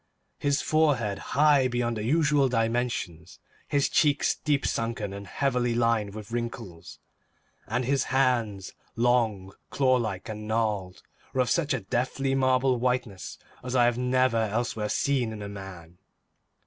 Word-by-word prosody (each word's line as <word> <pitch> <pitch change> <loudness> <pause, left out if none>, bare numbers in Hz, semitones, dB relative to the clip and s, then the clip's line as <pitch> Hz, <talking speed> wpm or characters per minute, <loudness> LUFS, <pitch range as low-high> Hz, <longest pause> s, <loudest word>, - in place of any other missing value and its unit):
His 145 0 +1
forehead, 135 -10 +1 0.2
high 145 -3 +5
beyond 120 -1 -1
the 105 - -4
usual 145 +1 +3
dimensions; 115 -8 -2 0.3
his 140 -1 +2
cheeks, 150 -2 +2
deep 145 -2 -1
sunken 115 -3 -2
and 100 0 -8
heavily 125 -1 0
lined 115 -4 +1
with 110 0 -9
wrinkles; 115 -7 -6 0.7
and 125 +3 -1
his 135 0 +1
hands, 120 -7 0 0.2
long, 115 -5 +1 0.2
claw 130 -2 +3
like 105 -6 -3
and 105 -1 -6
gnarled, 105 -5 -1 0.3
were 130 - +2
of 125 - 0
such 160 -4 +1
a 125 - -4
deathly, 130 +6 -1
marble 130 0 +2
like 120 - -3
whiteness 125 -6 -2 0.3
as 130 +1 -4
I 120 -1 +5
have 120 0 +1
never 125 -1 +2
elsewhere 110 0 -1
seen 130 -3 0
in 100 0 -7
man. 90 -3 -10
120 Hz, 145 wpm, -27 LUFS, 105-130 Hz, 0.7 s, high